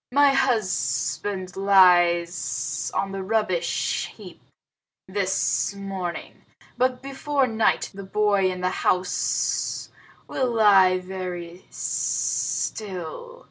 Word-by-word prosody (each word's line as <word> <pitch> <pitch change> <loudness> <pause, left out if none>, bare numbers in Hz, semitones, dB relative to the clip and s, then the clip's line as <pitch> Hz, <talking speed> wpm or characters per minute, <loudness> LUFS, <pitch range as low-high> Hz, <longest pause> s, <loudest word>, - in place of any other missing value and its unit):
My 285 +1 +5
husband 185 - -1
lies 175 -6 +3
on 195 0 -1
the 195 0 -4
rubbish 190 -4 -1
heap - - -12 0.7
this 195 +1 0
morning, 195 -3 -6 0.3
but 255 +1 0
before 275 0 0
night 225 -2 +1
the 195 0 -8
boy 200 -1 +2
in 180 0 -6
the 185 0 0
house 180 0 0 0.4
will 255 -2 -1
lie 195 -4 +6
very 180 -1 -7
still. 210 - -2
195 Hz, 95 wpm, -24 LUFS, 180-220 Hz, 0.7 s, lie